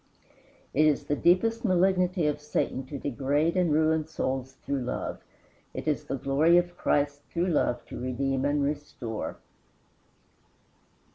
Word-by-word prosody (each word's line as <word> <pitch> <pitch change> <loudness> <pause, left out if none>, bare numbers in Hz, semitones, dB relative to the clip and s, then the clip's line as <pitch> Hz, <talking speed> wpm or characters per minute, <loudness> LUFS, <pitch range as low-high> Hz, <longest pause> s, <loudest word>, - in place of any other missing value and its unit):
It 155 +3 +4
is 150 - +2
the 145 - -1
deepest 205 +9 +3
malignity 185 -3 +2
of 150 0 0
Satan 150 -2 -2
to 145 - -5
degrade 145 +5 0
and 180 -3 +2
ruin 155 0 +2
souls 130 -4 -3
through 140 -1 -1
love. 125 - -4 0.5
It - - -5
is 150 - 0
the - - -2
glory 150 +6 +4
of 175 0 +1
Christ, 145 -3 0
through 175 +2 0
love, 125 -7 +1
to - - -8
redeem 130 +1 -1
and 145 0 +1
restore. 140 -6 -4
150 Hz, 140 wpm, -28 LUFS, 135-170 Hz, 0.5 s, It